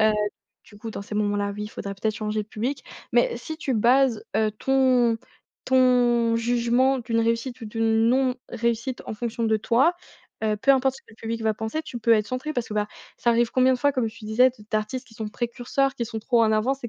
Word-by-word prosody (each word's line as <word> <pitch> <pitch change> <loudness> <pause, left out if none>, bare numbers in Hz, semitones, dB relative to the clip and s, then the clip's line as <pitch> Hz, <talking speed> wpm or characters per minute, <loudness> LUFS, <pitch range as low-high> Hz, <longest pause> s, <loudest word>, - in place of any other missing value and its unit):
heu, 215 0 +5 0.5
du 205 - -17
coup 225 +2 -6
dans - - -6
ces 205 - -8
moments-là, 205 -1 0
oui 210 0 -4
faudrait 200 -2 -6
peut-être 215 +2 -2
changer 215 0 -2
de 210 - -17
public. 245 +7 -3 0.3
Mais - - +3
si 315 -1 -7
tu 270 -5 -2
bases, 240 0 +3
heu, 220 -1 +2
ton 250 -1 +2 0.5
ton 245 -3 +3
jugement 240 +3 +2
d'une 230 -1 -1
réussite 230 +2 -1
ou 225 - -6
d'une 225 +1 +1
non 255 0 +2
réussite 235 +2 -2
en - - -4
fonction 230 +1 -4
de 220 -1 +3
toi, 255 +11 +3 0.5
heu, 215 -1 +1
peu 275 +6 +2
importe 265 0 +1
ce - - -16
que - - -62
le - - -18
public 225 0 -4
va 220 -1 +1
penser, 220 +9 -3
tu 245 -5 -7
peux 230 0 +3
être 215 -2 +3
centrée. 255 +6 -4
Parce 245 -2 -2
que, 210 - -5
bah, 210 0 0 0.3
ça - - -1
arrive 235 0 +2
combien 260 0 +4
de - - -4
fois 285 +2 +2
comme 250 -4 0
tu 215 0 -12
disais 245 +4 +4
de 220 -4 -17
d'artistes 215 +4 -2
qui 225 - -18
sont 220 -2 -5
précurseurs, 245 +4 -1
qui 235 - -3
sont 225 -1 -5
trop 235 0 +2
en 220 - +3
avance 250 +5 0
et - - -3
235 Hz, 230 wpm, -24 LUFS, 220-255 Hz, 0.5 s, heu